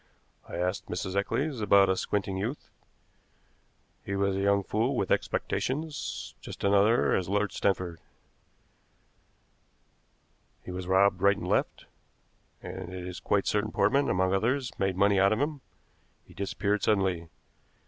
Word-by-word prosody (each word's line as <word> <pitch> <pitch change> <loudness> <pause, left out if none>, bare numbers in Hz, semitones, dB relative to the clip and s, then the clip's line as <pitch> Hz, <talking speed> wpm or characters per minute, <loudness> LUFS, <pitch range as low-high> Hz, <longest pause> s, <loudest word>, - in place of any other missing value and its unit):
"I - - -6
asked 90 +3 -2
Mrs. 95 +1 -4
Eccles 130 +6 -1
about 100 -1 +5
a 95 - +2
squinting 100 0 -2
youth. 110 +10 -4 1.3
He 100 - -3
was 100 0 +1
a - - -1
young 100 0 +2
fool 115 +8 0
with 100 - -1
expectations, 150 +2 -2
just - - -9
such - - +2
another 100 +4 +4
as 90 -1 -1
Lord 105 0 +1
Stanford. 90 -4 -1 2.6
He - - -7
was 90 0 -5
robbed 95 +2 +3
right 100 0 +4
and - - -6
left, - - 0 0.8
and 95 -1 -7
it 90 -1 -6
is 90 0 -6
quite 100 -1 0
certain 105 +1 0
Portman, 140 +1 +2
among 95 0 +1
others, 125 +6 0
made 95 -2 0
money 100 0 +4
out 100 +2 +4
of 110 - -1
him. 145 -1 -2 0.6
He - - -17
disappeared 100 +1 -1
suddenly. 95 -5 +1
100 Hz, 145 wpm, -28 LUFS, 95-110 Hz, 2.6 s, about